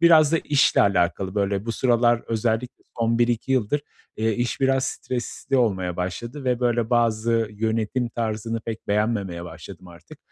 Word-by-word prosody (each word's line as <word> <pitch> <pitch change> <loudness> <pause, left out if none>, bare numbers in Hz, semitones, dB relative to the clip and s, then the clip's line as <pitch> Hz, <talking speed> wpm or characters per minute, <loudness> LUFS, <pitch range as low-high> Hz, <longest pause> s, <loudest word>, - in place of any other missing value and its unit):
biraz 160 -2 +6
da 165 - +4
işle 145 -2 +3
alakalı, 95 0 +1
böyle, 100 0 -1
bu 115 - -1
sıralar 120 -1 +2
özellikle 115 +2 -2
son 115 0 +1
1-2 120 +2 +1
yıldır, 130 +3 +1 0.4
eee, 110 0 +1
iş 120 +4 -2
biraz 135 0 +2
stresli 130 +2 -3
olmaya 95 -7 0
başladı 120 +10 -5
ve, 125 -1 0
böyle, 120 -2 +1
bazı 115 -1 +2
yönetim 110 +3 -1
tarzını 115 0 -3
pek 110 0 -7
beğenmemeye 100 -5 -1
başladım 90 +2 -11
artık. 85 -1 -14
115 Hz, 150 wpm, -24 LUFS, 100-120 Hz, 0.4 s, biraz